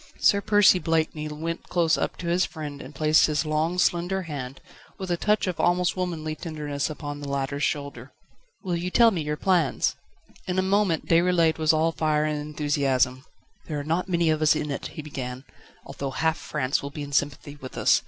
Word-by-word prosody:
Sir 200 - +4
Percy 205 -3 +5
Blakeney 160 -2 0
went 160 +3 -5
close 170 -2 +3
up - - -2
to 180 - -7
his 175 +2 +2
friend 145 -3 -6
and 135 +3 -11
placed 155 +2 +4
his 155 +1 0
long, 155 +3 0
slender 180 +2 +1
hand, 135 -5 -6 0.4
with 190 -2 -5
a - - +3
touch 210 +4 +1
of 185 -3 -3
almost 175 0 +2
womanly 170 -4 -3
tenderness 150 -4 -4
upon 145 -1 -6
the 145 - -7
latter's 140 +1 -2
shoulder. 140 -4 -3 0.5
"Will 180 -3 -1
you 175 +2 -2
tell 230 +4 +5
me 175 -6 -2
your 150 0 -2
plans?" 175 -6 +1 0.5
In 180 0 -1
a 185 - +3
moment 190 -4 +1
Déroulède 170 -1 +3
was 155 -1 +4
all 160 +1 +2
fire 155 -2 +1
and 150 -1 -1
enthusiasm. 140 -3 0 0.4
"There 150 -2 -3
are - - -4
not 170 +5 -1
many 170 -2 +2
of 155 0 -1
us 155 0 +5
in 150 -1 -2
it," 140 - -4
he 155 - -4
began, 130 -3 -6 0.4
"although 140 - -5
half 160 +4 0
France 130 +2 -1
will 140 - -5
be 145 +1 -6
in 145 - -8
sympathy 145 0 -1
with 130 - -9
us. - - +4
155 Hz, 200 wpm, -25 LUFS, 145-175 Hz, 0.5 s, Percy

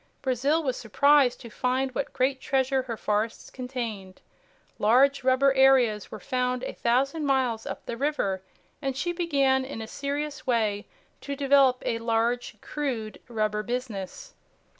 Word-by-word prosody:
Brazil 275 +5 +1
was 260 -3 -1
surprised 275 +3 +3
to 235 -3 -10
find 260 +2 0
what 275 - -3
great 260 +1 0
treasure 265 0 +1
her 240 -3 -6
forests 215 +2 -2
contained. 235 -7 -6 0.6
Large 260 +6 +4
rubber 260 +1 +4
areas 265 -6 +4
were 215 - -8
found 250 0 -1
a - - -4
thousand 275 +6 +1
miles 255 -5 +1
up - - -6
the 235 - -4
river 235 -9 -1 0.4
and 270 -2 -2
she 350 +4 -1
began 275 -6 +2
in 260 -3 -6
a 220 - -5
serious 285 +2 -4
way 215 -4 0 0.3
to 280 - -4
develop 275 -2 +4
a 230 - -1
large 230 0 0
crude 245 -8 -4
rubber 215 -2 -1
business. 245 - -5
255 Hz, 145 wpm, -27 LUFS, 230-275 Hz, 0.6 s, Large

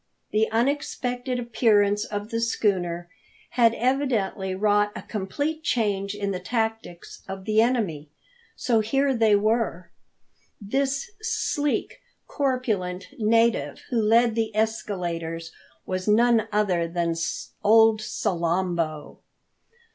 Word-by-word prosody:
The 215 +1 +2
unexpected 250 0 -1
appearance 210 -4 +2
of 205 +1 -5
the 230 0 -1
schooner 180 -6 0 0.4
had 230 -2 +4
evidently 230 -7 0
wrought 205 +1 +2
a - - -6
complete 290 +10 -3
change 205 -7 0
in 200 -1 -2
the 185 - -3
tactics 220 -3 -4
of 190 0 -7
the 215 0 +3
enemy. 200 - 0 0.5
So 235 -3 +1
here 270 +5 +1
they 220 -3 +4
were. 205 -5 0 0.7
This 270 - -1
sleek, 295 -8 -1 0.3
corpulent 220 -10 -2
native 220 -10 +2
who 235 -2 +2
led 230 +2 +4
the 225 -1 -1
escaladers 170 -7 -2 0.3
was 185 +1 -3
none 225 +1 +4
other 190 -5 +1
than 170 0 -1 0.5
old 220 +1 +5
Salambo! 170 -5 -2
215 Hz, 110 wpm, -25 LUFS, 185-235 Hz, 0.7 s, old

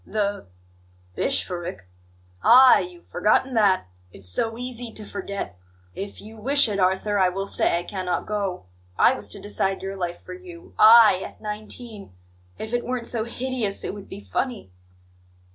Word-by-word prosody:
"The 205 - -2 0.7
bishopric?" 175 - -2 0.6
"Ah! 255 +2 +8
you've 355 -1 -7
forgotten 260 0 +1
that? 200 - +3 0.3
It's 95 -1 -11
so 225 - -1
easy 245 -1 -4
to 215 -1 -6
forget! 200 - -6 0.3
'If 200 +1 -7
you 220 +1 -11
wish 275 +6 +4
it, 205 -2 -2
Arthur, 190 +2 +1
I 185 -1 +4
will 195 +2 -3
say 185 - +1
I 175 - -3
cannot 185 -1 -3
go. 200 - -3 0.3
I - - +5
was - - -6
to - - -1
decide 190 - -2
your 195 0 -4
life 175 -2 -4
for - - -10
you 360 -1 -12
I, 220 -3 +8
at - - -10
nineteen! 215 - -8 0.4
If 220 +2 -6
it 240 - 0
weren't 250 -1 -3
so 230 -2 -2
hideous, 240 -4 -3
it - - -3
would 205 -1 -10
be 200 - -8
funny." 235 - -3
210 Hz, 160 wpm, -24 LUFS, 190-240 Hz, 0.7 s, Ah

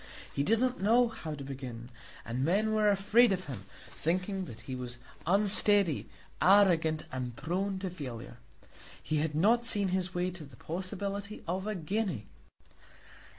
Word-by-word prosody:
He - - -1
did 220 +10 +2
not 255 +1 0
know 235 +4 +4
how 160 -8 -6
to 140 - -8
begin, 130 -3 -7 0.4
and 120 +3 -2
men 205 +8 +2
were 215 -1 +3
afraid 205 +4 +4
of 185 -1 -1
him, 120 -9 -7 0.3
thinking 185 +3 -2
that 115 -9 -10
he 130 - -7
was 125 -1 -5 0.3
unsteady, 200 -3 +4 0.3
arrogant, 170 -4 +4
and 125 -2 -4
prone 185 +7 -2
to 190 0 -3
failure. 125 -8 -8 0.7
He 155 - -1
had 150 0 -1
not 225 +9 +3
seen 205 -5 +1
his 185 0 0
way 180 +1 0
to 175 -3 -8
the 140 - -13
possibility 200 +4 -5
of 190 +4 -2
a 215 - -2
guinea. 180 - -2
185 Hz, 155 wpm, -31 LUFS, 145-205 Hz, 0.7 s, know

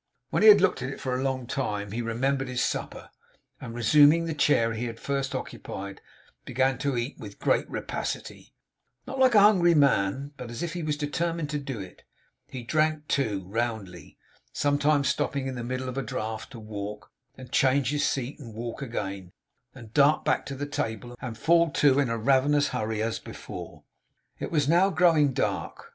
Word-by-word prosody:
When - - +1
he 215 - +9
had 205 -2 +8
looked 185 - +2
at 130 - -3
it 135 - -7
for 130 - -3
a 130 - -1
long 130 -2 -1
time, 105 -7 -3
he 115 +3 -2
remembered 135 +4 -1
his 125 0 -1
supper; - - -4 0.5
and 115 - -8
resuming 145 +7 +5
the 165 - -2
chair 140 -6 +2
he 115 +2 -3
had 115 -1 -6
first 135 -1 -2
occupied, 100 0 -6 0.4
began 130 0 0
to 140 -2 -1
eat 120 +4 -3
with 100 -2 -9
great - - +1
rapacity; - - -5 0.5
not 265 +1 -6
like 260 -3 +5
a - - +9
hungry 180 -5 +5
man, 140 -1 +2
but 125 -2 -7
as 115 +5 -5
if 170 -1 -3
he 175 - -4
were 155 -1 -1
determined 155 +1 -2
to 150 - -1
do 135 -5 -5
it. 95 -2 -10 0.5
He 125 -2 -7
drank 155 +3 0
too, 105 -9 0
roundly; 105 -6 -4 0.3
sometimes 145 0 +2
stopping 140 0 -1
in 135 - -3
the 120 -2 -5
middle 130 +2 -3
of 130 +1 -3
a - - 0
draught 110 -2 -4
to 120 - -8
walk, 105 -2 -7 0.3
and 130 -1 -11
change 135 -1 +3
his 145 -1 0
seat 135 +2 -2
and 115 -6 -10
walk 115 +2 -5
again, 100 -7 -5 0.4
and 115 -4 -12
dart 145 +1 +4
back - - +1
to 140 - -5
the 145 +2 -4
table 120 -3 -4
and 120 -4 -6
fall 170 +5 +4
to, 140 -1 +4
in 140 -4 +1
a 115 - -1
ravenous 140 +4 +3
hurry, 110 0 -2
as 115 0 -2
before. - - -9 0.6
It - - -4
was 150 -4 +1
now 175 +5 +4
growing 165 -7 +4
dark. 125 - -3
130 Hz, 190 wpm, -27 LUFS, 115-145 Hz, 0.6 s, he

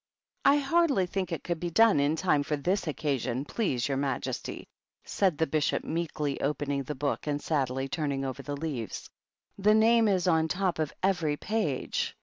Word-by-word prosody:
" - - -44
I - - +4
hardly 285 - +2
think 185 0 -3
it 165 - -3
could 170 -2 -2
be 175 - -2
done 220 -1 +5
in 145 +2 +2
time 160 -4 +2
for 150 +1 -1
this 180 +6 -1
Occasion, 135 -4 -1
please 140 - -1
your 135 -1 -1
majesty," 135 -2 -3 0.4
said 185 -6 +1
the 160 - +2
Bishop, 150 0 0
meekly, 155 -4 -2
opening 145 0 -1
the 145 +3 -5
book, 145 +2 -2
and 145 -1 0
sadly 135 -3 -1
turning 140 -1 -2
over 135 +1 -4
the 145 +1 -5
leaves. 140 - -4 0.5
"The 210 +2 +5
name 225 +1 +5
is 185 -3 +1
on 160 -2 +3
top 180 +1 -1
of 155 -2 -1
every 170 -6 +1
page." 210 -12 -2
155 Hz, 180 wpm, -29 LUFS, 140-185 Hz, 0.5 s, done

